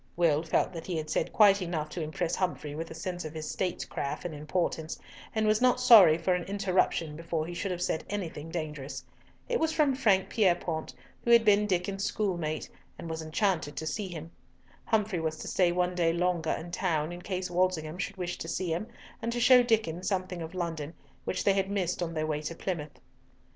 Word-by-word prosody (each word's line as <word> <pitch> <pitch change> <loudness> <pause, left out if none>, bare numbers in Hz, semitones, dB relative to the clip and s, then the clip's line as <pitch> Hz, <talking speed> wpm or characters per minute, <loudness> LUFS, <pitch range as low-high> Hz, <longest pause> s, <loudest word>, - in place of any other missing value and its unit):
Will 160 -3 +3
felt 165 +2 0
that 165 -1 -7
he 180 -3 -2
had 155 -1 -4
said - - 0
quite 205 -2 +6
enough 165 -4 -2
to 175 - -5
impress 160 +2 -2
Humfrey 175 -5 -2
with 165 +2 -5
a 160 - -8
sense 175 +1 -4
of 155 0 -7
his 155 -1 -4
statecraft 175 -6 -3
and 175 - -3
importance, 155 +1 -2 0.4
and 220 0 +2
was 215 +1 +3
not 250 0 +4
sorry 205 -10 +8
for 175 +2 +1
an 180 -1 -1
interruption 185 -5 0
before 165 -1 -2
he 175 - -6
should 195 +3 -3
have 180 -1 -2
said 160 - -1
anything 165 -6 -4
dangerous. 150 -4 -5 0.4
It 480 -1 0
was 320 0 +2
from 300 -4 +3
Frank 200 -7 +3
Pierrepoint, 175 - 0 0.3
who - - -2
had 235 -1 +7
been 210 0 +5
Diccon's 195 +1 -1
schoolmate, 170 -9 -1 0.3
and 165 - -6
was 160 0 -3
enchanted 160 -2 0
to 160 - -4
see 200 +5 -2
him. 165 -2 -8 0.5
Humfrey 210 -5 +1
was 160 -1 -2
to - - -7
stay 180 -2 +3
one 180 +1 +1
day 170 -2 +2
longer 170 -1 0
in 170 +2 -3
town 165 -3 0
in 175 0 -7
case 185 -1 -3
Walsingham 175 -2 0
should 200 0 -3
wish 175 -1 -4
to - - -5
see 170 0 -1
him, 180 +7 -3 0.3
and 230 0 -1
to 240 - -2
show 250 +1 +7
Diccon 220 -8 +1
something 185 -2 -2
of 165 +3 -7
London, 165 -3 -3 0.3
which 185 - -1
they 200 - +4
had 195 0 0
missed 185 -3 -1
on 165 -1 -2
their 155 0 0
way 150 -1 -1
to 160 +2 -5
Plymouth. 155 -5 -4
175 Hz, 210 wpm, -29 LUFS, 160-195 Hz, 0.5 s, sorry